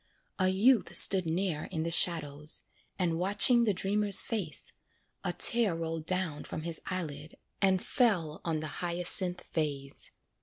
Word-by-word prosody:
A 185 Hz, -, +2 dB
youth 215 Hz, +5 st, +1 dB
stood 185 Hz, -3 st, +6 dB
near 165 Hz, -2 st, -3 dB
in 160 Hz, -4 st, -5 dB
the 165 Hz, -, -4 dB
shadows, 150 Hz, -3 st, +2 dB, 0.3 s
And 170 Hz, -3 st, -2 dB
watching 205 Hz, +6 st, +5 dB
the 215 Hz, -, +1 dB
dreamer's 200 Hz, +1 st, +2 dB
face, 200 Hz, -9 st, -5 dB, 0.5 s
A -, -, -1 dB
tear 230 Hz, -7 st, +3 dB
rolled 165 Hz, -1 st, -6 dB
down 180 Hz, -5 st, -1 dB
from 155 Hz, -, -8 dB
his 165 Hz, -1 st, -6 dB
eyelid 155 Hz, -4 st, -6 dB, 0.2 s
And 190 Hz, -2 st, +1 dB
fell 180 Hz, -, -1 dB
on 160 Hz, -2 st, -3 dB
the 155 Hz, -, -5 dB
hyacinth 175 Hz, +1 st, +1 dB
vase. 140 Hz, -4 st, -4 dB
175 Hz, 145 wpm, -29 LUFS, 160-195 Hz, 0.5 s, stood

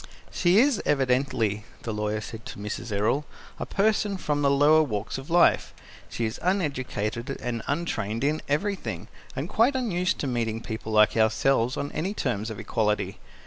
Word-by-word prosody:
"She 180 Hz, +2 st, +3 dB
is 255 Hz, -1 st, +4 dB
evidently," 125 Hz, -6 st, +1 dB, 0.2 s
the 115 Hz, -, -3 dB
lawyer 105 Hz, 0 st, -1 dB
said 110 Hz, +1 st, -8 dB
to -, -, -8 dB
Mrs. 105 Hz, +3 st, -5 dB
Errol, 105 Hz, +8 st, +1 dB, 0.4 s
"a -, -, -4 dB
person 205 Hz, -1 st, +1 dB
from 150 Hz, -5 st, -1 dB
the 140 Hz, -, +4 dB
lower 145 Hz, +3 st, +5 dB
walks 110 Hz, -5 st, -2 dB
of 135 Hz, -, -11 dB
life. 175 Hz, +1 st, +3 dB, 0.3 s
She 115 Hz, -, -2 dB
is 110 Hz, -, -4 dB
uneducated 135 Hz, -, -1 dB
and 120 Hz, -2 st, -3 dB
untrained 115 Hz, -8 st, -2 dB
in 150 Hz, +2 st, +1 dB
everything, 195 Hz, +7 st, -2 dB, 0.3 s
and -, -, -3 dB
quite 245 Hz, +5 st, +3 dB
unused 190 Hz, -7 st, 0 dB
to -, -, -2 dB
meeting 115 Hz, -3 st, -1 dB
people 110 Hz, -1 st, -6 dB
like 105 Hz, 0 st, +5 dB
ourselves 115 Hz, +3 st, +2 dB
on 145 Hz, -, -3 dB
any 190 Hz, +6 st, -2 dB
terms 115 Hz, -, -2 dB
of 110 Hz, -, -6 dB
equality. 105 Hz, -2 st, -1 dB
130 Hz, 165 wpm, -26 LUFS, 110-170 Hz, 0.4 s, lower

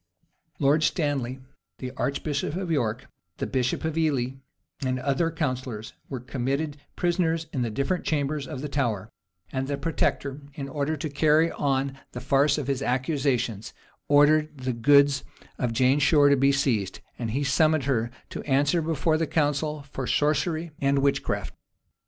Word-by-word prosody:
Lord 145 Hz, +2 st, +3 dB
Stanley, 140 Hz, -6 st, 0 dB, 0.4 s
the 130 Hz, -1 st, -5 dB
archbishop 140 Hz, +2 st, -2 dB
of 185 Hz, -2 st, -3 dB
York, 125 Hz, -4 st, 0 dB, 0.3 s
the -, -, -2 dB
bishop 130 Hz, +4 st, -1 dB
of 160 Hz, -1 st, -1 dB
Ely, 140 Hz, -6 st, +1 dB, 0.5 s
and 130 Hz, -1 st, 0 dB
other 140 Hz, +6 st, +1 dB
counsellors, 130 Hz, -8 st, -3 dB, 0.2 s
were 130 Hz, -, -4 dB
committed 140 Hz, +4 st, -2 dB, 0.2 s
prisoners 170 Hz, -2 st, +1 dB
in 120 Hz, -4 st, -1 dB
different 175 Hz, +7 st, 0 dB
chambers 145 Hz, -1 st, -1 dB
of 145 Hz, -5 st, -6 dB
the 150 Hz, -, -3 dB
Tower; 115 Hz, -8 st, -1 dB, 0.4 s
and 135 Hz, 0 st, -2 dB
the 140 Hz, 0 st, -2 dB
protector, 140 Hz, -1 st, -1 dB
in 140 Hz, -2 st, -5 dB
order 145 Hz, +3 st, -2 dB
to 150 Hz, -, -3 dB
carry 155 Hz, +3 st, +3 dB
on 135 Hz, -1 st, -1 dB
the -, -, -4 dB
farce 140 Hz, +2 st, +3 dB
of 150 Hz, -, -2 dB
his 135 Hz, -1 st, -1 dB
accusations, 130 Hz, -4 st, -1 dB, 0.3 s
ordered 150 Hz, +1 st, +4 dB
the 130 Hz, -1 st, -2 dB
goods 140 Hz, +3 st, +4 dB, 0.4 s
of 125 Hz, -2 st, 0 dB
Jane 130 Hz, +4 st, +3 dB
Shore 145 Hz, 0 st, +5 dB
to 140 Hz, -, +6 dB
be 140 Hz, +1 st, +4 dB
seized; 120 Hz, -9 st, 0 dB, 0.2 s
and 115 Hz, -2 st, -2 dB
he 135 Hz, +6 st, -1 dB
summoned 155 Hz, +2 st, +3 dB
her 120 Hz, -4 st, 0 dB, 0.2 s
to -, -, -5 dB
answer 145 Hz, +4 st, +2 dB
before 155 Hz, 0 st, +1 dB
the 165 Hz, -, 0 dB
council 150 Hz, 0 st, 0 dB
for 130 Hz, -2 st, -4 dB
sorcery 155 Hz, +3 st, +1 dB
and 140 Hz, 0 st, +2 dB
witchcraft. 140 Hz, 0 st, 0 dB
140 Hz, 155 wpm, -26 LUFS, 130-155 Hz, 0.5 s, to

